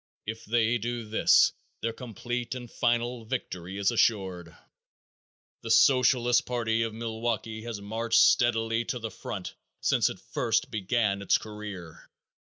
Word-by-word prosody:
If 110 Hz, +1 st, -6 dB
they 115 Hz, +1 st, +2 dB
do 120 Hz, 0 st, -4 dB
this 110 Hz, -, +4 dB, 0.3 s
their 115 Hz, 0 st, -2 dB
complete 120 Hz, +1 st, -5 dB
and 120 Hz, -2 st, -8 dB
final 120 Hz, 0 st, 0 dB
victory 95 Hz, -6 st, -5 dB
is 100 Hz, -1 st, +2 dB
assured. 90 Hz, -7 st, 0 dB, 1.1 s
The -, -, -7 dB
Socialist 125 Hz, -2 st, +4 dB
party 115 Hz, -2 st, 0 dB
of 115 Hz, -1 st, -1 dB
Milwaukee 110 Hz, 0 st, -3 dB
has 115 Hz, -3 st, -5 dB
marched 115 Hz, +3 st, +1 dB
steadily 115 Hz, -1 st, +3 dB
to 125 Hz, -, -3 dB
the 110 Hz, -2 st, -5 dB
front -, -, -6 dB, 0.3 s
since -, -, +2 dB
it -, -, -8 dB
first 115 Hz, -2 st, -1 dB
began 105 Hz, -1 st, 0 dB
its 100 Hz, -, +3 dB
career. 105 Hz, -6 st, -9 dB
115 Hz, 135 wpm, -28 LUFS, 105-120 Hz, 1.1 s, this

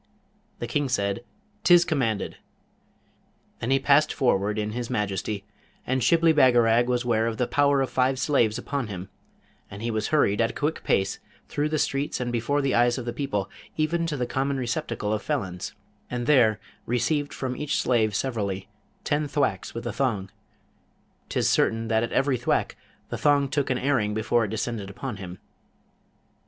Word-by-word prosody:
The -, -, -4 dB
King 140 Hz, +3 st, -1 dB
said, 100 Hz, -2 st, -1 dB, 0.4 s
''Tis 175 Hz, -1 st, +6 dB
commanded!' 125 Hz, -, -1 dB, 1.2 s
Then 115 Hz, -, -3 dB
he 135 Hz, -, +4 dB
passed 140 Hz, +3 st, +4 dB
forward 105 Hz, -6 st, +1 dB
in 105 Hz, 0 st, -1 dB
his 120 Hz, +1 st, -4 dB
majesty, 105 Hz, -3 st, -2 dB, 0.4 s
and 130 Hz, 0 st, 0 dB
Shibli 165 Hz, +3 st, +4 dB
Bagarag 120 Hz, -4 st, +5 dB
was 125 Hz, -1 st, 0 dB
ware 115 Hz, -2 st, +2 dB
of 115 Hz, -1 st, -3 dB
the 125 Hz, -, +1 dB
power 140 Hz, +1 st, +3 dB
of 135 Hz, -, 0 dB
five 130 Hz, +1 st, +2 dB
slaves 125 Hz, -5 st, +2 dB
upon 135 Hz, 0 st, -3 dB
him, 95 Hz, -2 st, -7 dB, 0.6 s
and 100 Hz, +3 st, -8 dB
he 120 Hz, -, -1 dB
was 110 Hz, -1 st, -1 dB
hurried 120 Hz, -9 st, +2 dB
at 115 Hz, -, +2 dB
a -, -, -7 dB
quick 150 Hz, +2 st, -2 dB
pace 95 Hz, 0 st, +1 dB, 0.3 s
through 150 Hz, +1 st, -1 dB
the 155 Hz, -, 0 dB
streets 140 Hz, 0 st, -1 dB
and 125 Hz, -1 st, -2 dB
before 130 Hz, +5 st, 0 dB
the 135 Hz, -, +1 dB
eyes 120 Hz, +1 st, +3 dB
of 125 Hz, -, -5 dB
the 120 Hz, -, -3 dB
people, 135 Hz, -9 st, -2 dB, 0.3 s
even 165 Hz, +2 st, +1 dB
to 150 Hz, -3 st, -2 dB
the 125 Hz, -, 0 dB
common 135 Hz, +3 st, -1 dB
receptacle 120 Hz, -4 st, -2 dB
of 110 Hz, -, -1 dB
felons, 95 Hz, -, -3 dB, 0.3 s
and 120 Hz, -1 st, -3 dB
there 120 Hz, -7 st, +4 dB, 0.3 s
received 145 Hz, +5 st, 0 dB
from 130 Hz, -2 st, -4 dB
each 150 Hz, +2 st, -1 dB
slave 110 Hz, -4 st, +2 dB
severally 100 Hz, -7 st, -2 dB, 0.4 s
ten 150 Hz, +1 st, 0 dB
thwacks 135 Hz, -11 st, -1 dB
with 115 Hz, +1 st, -5 dB
a 120 Hz, -, -3 dB
thong: 105 Hz, -8 st, -1 dB, 1.0 s
'tis -, -, +1 dB
certain 115 Hz, 0 st, +2 dB
that 110 Hz, 0 st, +3 dB
at 115 Hz, -, -2 dB
every 135 Hz, -1 st, +2 dB
thwack 120 Hz, -, 0 dB, 0.3 s
the -, -, -4 dB
thong 145 Hz, -1 st, +3 dB
took 140 Hz, 0 st, -1 dB
an 130 Hz, -, +1 dB
airing 120 Hz, -7 st, +1 dB
before 115 Hz, +1 st, +2 dB
it -, -, -5 dB
descended 110 Hz, -1 st, -3 dB
upon 110 Hz, +2 st, -6 dB
him. 95 Hz, -2 st, -8 dB
120 Hz, 175 wpm, -26 LUFS, 110-140 Hz, 1.2 s, Tis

